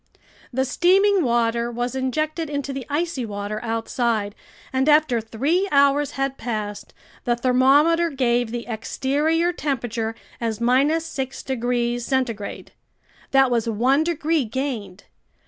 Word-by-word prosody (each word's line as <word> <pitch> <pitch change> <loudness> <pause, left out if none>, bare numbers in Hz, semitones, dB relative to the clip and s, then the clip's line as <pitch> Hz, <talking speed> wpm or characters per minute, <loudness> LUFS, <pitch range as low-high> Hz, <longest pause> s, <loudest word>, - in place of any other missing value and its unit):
The 265 +1 0
steaming 380 +6 +3
water 235 -1 +1
was 240 +1 -3
injected 310 +5 -2
into 285 -1 -3
the 265 -2 -6
icy 300 -2 -1
water 210 0 -5
outside, 225 -2 -1 0.4
and 265 +3 +2
after 300 -6 +4
three 285 - 0
hours 280 0 +3
had 270 0 -2
passed, 215 -3 -4 0.3
the 240 -2 +1
thermometer 275 +7 +4
gave 245 -4 +1
the 235 +1 -5
exterior 290 +9 0
temperature 235 -7 -2 0.2
as 225 -2 -2 0.5
6 270 -4 -5
degrees 240 -1 -1
centigrade. 235 -5 -2 0.6
That 270 -1 +4
was 230 -1 +1
one 255 +7 +2
degree 325 -2 0
gained. 220 -6 -4
260 Hz, 120 wpm, -23 LUFS, 235-290 Hz, 0.6 s, after